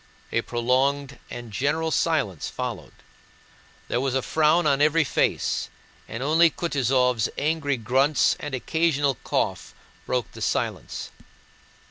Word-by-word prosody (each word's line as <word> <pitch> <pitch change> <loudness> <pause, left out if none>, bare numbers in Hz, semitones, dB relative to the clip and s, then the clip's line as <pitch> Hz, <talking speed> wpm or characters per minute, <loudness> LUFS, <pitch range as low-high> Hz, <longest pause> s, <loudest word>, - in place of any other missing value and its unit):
A - - +1
prolonged 135 +3 0
and 120 -2 -8
general 155 +7 0
silence 140 - 0
followed. - - -5 0.9
There 120 - 0
was 135 -1 -1
a 130 - +1
frown 160 +2 +3
on 140 -1 +3
every 155 +2 +4
face 135 - 0 0.4
and 115 +3 -5
only 165 +4 +5
Kutúzov's 130 -8 +1
angry 150 -2 0
grunts 130 +6 +2
and 145 -2 -4
occasional 145 0 +1
cough - - -2 0.3
broke 125 -4 -1
the - - -11
silence. - - -2
140 Hz, 120 wpm, -25 LUFS, 125-155 Hz, 0.9 s, only